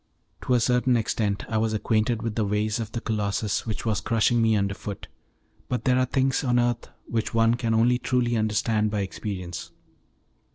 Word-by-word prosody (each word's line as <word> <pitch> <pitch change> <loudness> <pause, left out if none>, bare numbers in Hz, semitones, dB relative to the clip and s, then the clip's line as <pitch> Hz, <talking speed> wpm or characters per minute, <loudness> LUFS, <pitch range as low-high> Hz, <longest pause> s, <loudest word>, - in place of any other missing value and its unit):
To 125 - +1
a - - +4
certain 125 +1 +2
extent 105 -2 -1
I 110 -1 0
was 110 0 0
acquainted 110 +1 0
with 115 -2 -2
the 110 - 0
ways 105 +2 0
of 110 -2 -4
the 115 - -3
Colossus 105 -1 -1
which 110 0 -4
was 110 -2 0
crushing 115 +1 +2
me 110 -1 +3
under 100 -1 0
foot, 100 0 -7 0.6
but 125 - -1
there 130 -1 +3
are 130 - +3
things 135 +1 +1
on 125 -2 +2
earth 120 -1 0 0.2
which 115 0 -2
one 115 0 +4
can 115 -2 0
only 120 +2 +3
truly 125 -2 +1
understand 110 0 +1
by 105 -1 -1
experience. 95 -3 -5
115 Hz, 190 wpm, -25 LUFS, 105-120 Hz, 0.6 s, a